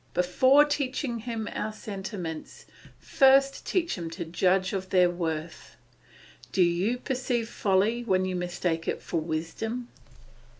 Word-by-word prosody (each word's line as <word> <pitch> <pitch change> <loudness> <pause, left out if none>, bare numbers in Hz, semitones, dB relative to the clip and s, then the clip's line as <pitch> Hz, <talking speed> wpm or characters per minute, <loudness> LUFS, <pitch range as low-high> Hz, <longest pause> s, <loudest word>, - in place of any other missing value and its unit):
Before 260 +11 +5
teaching 270 -4 -2
him 225 -2 -4
our 215 - -3
sentiments, 195 -6 -7 0.3
first 275 0 +3
teach 345 -2 0
him 170 -4 -5
to 170 +1 -6
judge 185 +3 +1
of 190 -1 -3
their 180 -1 +4
worth. 165 -2 -5 0.8
Do 185 - +4
you 180 +8 +1
perceive 250 -3 -2
folly 210 +4 +1
when 185 -5 +1
you 185 -1 -2
mistake 175 -2 -2
it - - -1
for 170 - -2
wisdom? 175 +10 -4
195 Hz, 130 wpm, -27 LUFS, 175-240 Hz, 0.8 s, Before